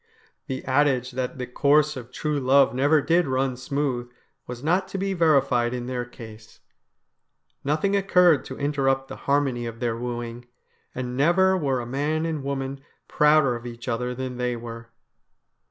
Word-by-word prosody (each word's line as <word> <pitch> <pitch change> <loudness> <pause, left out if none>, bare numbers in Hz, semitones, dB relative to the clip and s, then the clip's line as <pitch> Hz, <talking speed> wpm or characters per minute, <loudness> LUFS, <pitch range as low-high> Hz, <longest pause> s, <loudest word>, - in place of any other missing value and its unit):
The 130 - -5
adage 130 -2 +2
that 130 +1 -4
the 125 - -3
course 150 +4 +2
of 125 -2 -9
true 150 +1 -2
love 135 +1 +4
never 145 +3 +3
did 170 -1 +2
run 130 0 0
smooth 130 -1 -2 0.4
was 125 +1 -7
not 180 +5 +1
to 195 - -5
be 195 0 -1
verified 135 -8 +2
in 120 -1 -4
their 125 -1 -3
case. 110 -3 -13 1.0
Nothing 155 +8 +1
occurred 180 -7 +4
to 130 - -8
interrupt 135 -2 0
the - - -6
harmony 135 -4 +1
of 115 0 -8
their 120 -1 -1
wooing, 120 0 -5 0.5
and 125 -1 -4
never 180 +7 +4
were 140 -7 0
a - - -6
man 145 +6 -1
and 160 -3 -2
woman 135 0 -4 0.3
prouder 150 -4 +4
of 120 +1 -7
each 120 +1 -9
other 125 +1 -2
than 130 -1 -5
they 125 -1 -1
were. 115 0 -8
135 Hz, 165 wpm, -24 LUFS, 125-150 Hz, 1.0 s, love